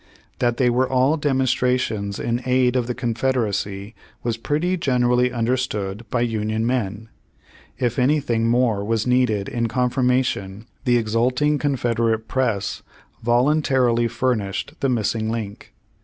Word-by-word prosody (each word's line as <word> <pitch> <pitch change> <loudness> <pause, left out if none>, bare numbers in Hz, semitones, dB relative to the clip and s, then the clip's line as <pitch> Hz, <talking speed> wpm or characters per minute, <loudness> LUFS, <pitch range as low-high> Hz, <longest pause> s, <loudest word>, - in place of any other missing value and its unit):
That 120 -1 +1
they 125 -2 +3
were 125 +2 +1
all 130 +3 +3
demonstrations 125 -7 0
in 120 +1 -1
aid 125 0 +3
of 125 -2 0
the 125 - -3
Confederacy 110 -5 -2 0.3
was 120 -1 -1
pretty 150 +10 -1
generally 125 -5 +2
understood 115 -4 -2
by 120 - 0
Union 110 -1 -1
men. 115 -3 -2 0.7
If 120 -1 -1
any 145 +5 +3
thing 115 -5 0
more 115 -4 +2
was 110 +1 0
needed 125 -5 +1
in 115 -1 -1
confirmation 125 -4 0 0.2
the 120 -1 +4
exulting 125 +6 +1
Confederate 115 -5 0
press 115 -7 -1 0.4
voluntarily 125 -1 +2
furnished 110 -6 -2
the 135 - +1
missing 110 -2 0
link. 110 -3 -5
120 Hz, 125 wpm, -22 LUFS, 110-130 Hz, 0.7 s, the